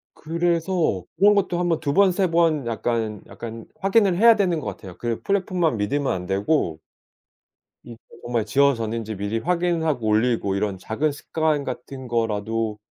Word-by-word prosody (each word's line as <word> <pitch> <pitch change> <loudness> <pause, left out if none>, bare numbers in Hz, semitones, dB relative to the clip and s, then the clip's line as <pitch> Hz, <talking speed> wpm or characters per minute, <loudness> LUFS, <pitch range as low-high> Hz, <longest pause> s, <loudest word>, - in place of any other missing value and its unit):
그래서 170 - 0
그런 205 +3 +5
것도 180 -3 +1
한번 175 -2 +1
2 145 -2 -1
번 200 +1 +5
3 190 +1 +1
번 165 -5 +2
약간, 115 -2 -2
약간 115 -1 -8
확인을 195 -2 +3
해야 230 +1 +7
되는 180 -6 +1
것 - - -7
같아요. 95 -4 -8
그 120 -1 -3
플랫폼만 180 - 0
믿으면 135 +7 0
안 90 0 -3
되고 95 - 0 1.0
이게 115 -1 -11 0.3
정말 120 -3 -1
지워졌는지 115 -4 +1
미리 100 +3 -2
확인하고 165 -6 0
올리고 110 -2 +1
이런 100 -1 -1
작은 140 +11 -1
습관 155 0 -1
같은 130 0 -7
거라도 115 -1 -1
135 Hz, 305 characters per minute, -23 LUFS, 110-170 Hz, 1.0 s, 해야